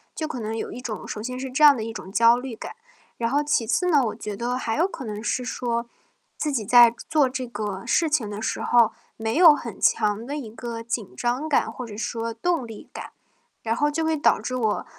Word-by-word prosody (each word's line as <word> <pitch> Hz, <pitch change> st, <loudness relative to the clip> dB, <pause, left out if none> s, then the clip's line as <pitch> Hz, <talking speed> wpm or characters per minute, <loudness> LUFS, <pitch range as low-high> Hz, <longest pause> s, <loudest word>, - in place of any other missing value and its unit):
就 315 Hz, -, -3 dB
可 260 Hz, -5 st, -5 dB
能 220 Hz, 0 st, -4 dB
有 -, -, -4 dB
一 245 Hz, -, -7 dB
种 230 Hz, -4 st, -6 dB
首 210 Hz, -, -5 dB
先 250 Hz, +2 st, -5 dB
是 260 Hz, 0 st, -5 dB
这 300 Hz, +4 st, +1 dB
样 290 Hz, -2 st, +9 dB
的 220 Hz, -, -4 dB
一 225 Hz, -, -4 dB
种 190 Hz, -, -8 dB
焦 230 Hz, +3 st, +5 dB
虑 250 Hz, -2 st, -6 dB
感。 -, -, -7 dB, 0.5 s
然 230 Hz, 0 st, 0 dB
后 290 Hz, +2 st, +1 dB
其 290 Hz, -7 st, +1 dB
次 360 Hz, +9 st, +1 dB
呢， 290 Hz, -4 st, +5 dB
我 215 Hz, -, -3 dB
觉 210 Hz, -2 st, -6 dB
得 245 Hz, +2 st, -2 dB
还 225 Hz, -1 st, -2 dB
有 345 Hz, +4 st, +3 dB
可 270 Hz, -, -8 dB
能 210 Hz, -2 st, -5 dB
是 250 Hz, +2 st, -1 dB
说， 235 Hz, -1 st, -2 dB, 0.5 s
自 300 Hz, -, -1 dB
己 220 Hz, -5 st, -1 dB
在 235 Hz, 0 st, +7 dB
做 300 Hz, -4 st, +4 dB
这 255 Hz, -1 st, -4 dB
个 205 Hz, -4 st, -5 dB
事 325 Hz, -2 st, +2 dB
情 240 Hz, -9 st, +1 dB
的 205 Hz, 0 st, -6 dB
时 -, -, -2 dB
候 235 Hz, -2 st, +4 dB, 0.3 s
没 225 Hz, +1 st, -2 dB
有 330 Hz, -4 st, +8 dB
很 235 Hz, -5 st, -8 dB
强 210 Hz, +1 st, +2 dB
的 290 Hz, -, -3 dB
一 230 Hz, -7 st, -7 dB
个 230 Hz, 0 st, -6 dB
紧 230 Hz, -3 st, -4 dB
张 250 Hz, +6 st, -1 dB, 0.2 s
或 250 Hz, -, -6 dB
者 210 Hz, -1 st, -9 dB
说 230 Hz, +1 st, -3 dB
动 265 Hz, +1 st, -1 dB
力 220 Hz, -2 st, -10 dB
感， -, -, -8 dB, 0.5 s
然 225 Hz, 0 st, 0 dB
后 295 Hz, +4 st, +2 dB
就 320 Hz, +2 st, -1 dB
会 320 Hz, 0 st, +1 dB
导 290 Hz, -, +3 dB
致 255 Hz, -, -4 dB
我， 220 Hz, -4 st, 0 dB
235 Hz, 255 characters per minute, -24 LUFS, 225-275 Hz, 0.5 s, 样